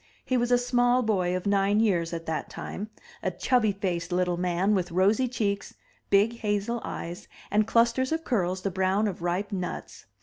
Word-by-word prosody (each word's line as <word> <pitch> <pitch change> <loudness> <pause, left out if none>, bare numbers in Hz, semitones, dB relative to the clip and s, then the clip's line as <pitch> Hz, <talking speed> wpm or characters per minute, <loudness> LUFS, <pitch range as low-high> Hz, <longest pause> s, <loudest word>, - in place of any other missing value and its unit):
He 255 - 0
was 240 0 +1
a 245 - +6
small 245 0 +2
boy 185 -5 +1
of 185 - -7
nine 200 +1 +2
years 180 -7 +2
at 165 -1 -5
that 160 -1 -3
time 210 +2 -6 0.2
— 475 0 -21
a - - 0
chubby 245 -5 +2
faced 180 -3 -3
little 180 0 +1
man 180 +3 +1
with 185 -3 0
rosy 200 +8 +3
cheeks, 205 -5 -2 0.3
big 210 +4 +3
hazel 210 +2 -1
eyes, 170 +1 -6 0.2
and 210 +1 +3
clusters 235 +4 +2
of 325 0 -1
curls 185 - -1
the 195 - -1
brown 190 +3 +1
of 185 -4 -5
ripe 180 +5 -1
nuts. 180 -3 -5
200 Hz, 190 wpm, -27 LUFS, 180-235 Hz, 0.3 s, a